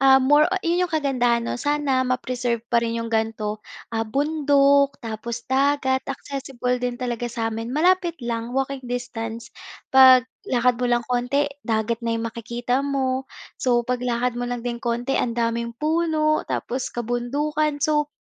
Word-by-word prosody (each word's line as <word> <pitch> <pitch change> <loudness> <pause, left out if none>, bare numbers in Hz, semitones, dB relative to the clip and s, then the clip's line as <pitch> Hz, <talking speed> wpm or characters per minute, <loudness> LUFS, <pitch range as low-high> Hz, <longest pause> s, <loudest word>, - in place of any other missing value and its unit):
ah, 270 0 +7
more 295 +3 +5 0.2
yun 350 +2 +2
yung 350 - -16
kagandahan 245 -6 +1
'no. - - -2
Sana 290 -3 +1
ma-preserve 250 -2 -1
pa 235 - +5
rin 230 0 -2
yung 230 0 -4
ganito, 220 -1 -1 0.3
ah, 225 -1 -1
bundok 280 0 +3
tapos 230 +1 -5
dagat. 265 0 +2
Accessible 270 -2 -3
din 245 -1 -2
talaga 240 -1 -3
sa'min, 225 -1 -3
malapit 345 +4 +2
lang, 235 +2 -3
walking 270 0 -1
distance. 230 -2 -5 0.4
Paglakad 255 -1 +5
mo 250 - +1
lang 240 -1 +1
konti, 250 +3 +1 0.2
dagat 225 -1 -1
na 230 -1 -1
yung 225 - -3
makikita 240 +3 -2
mo. 265 -2 -1 0.3
So, 240 -2 +2
paglakad 250 0 -1
mo 245 +1 -4
lang 245 -1 -4
din 240 -1 -3
konti, 240 +3 -1
ang 235 -1 -2
daming 235 0 -1
puno 310 0 +1
tapos 255 +1 -2
kabundukan. 285 +5 -1
So, 300 -1 +1
250 Hz, 150 wpm, -23 LUFS, 235-280 Hz, 0.4 s, ah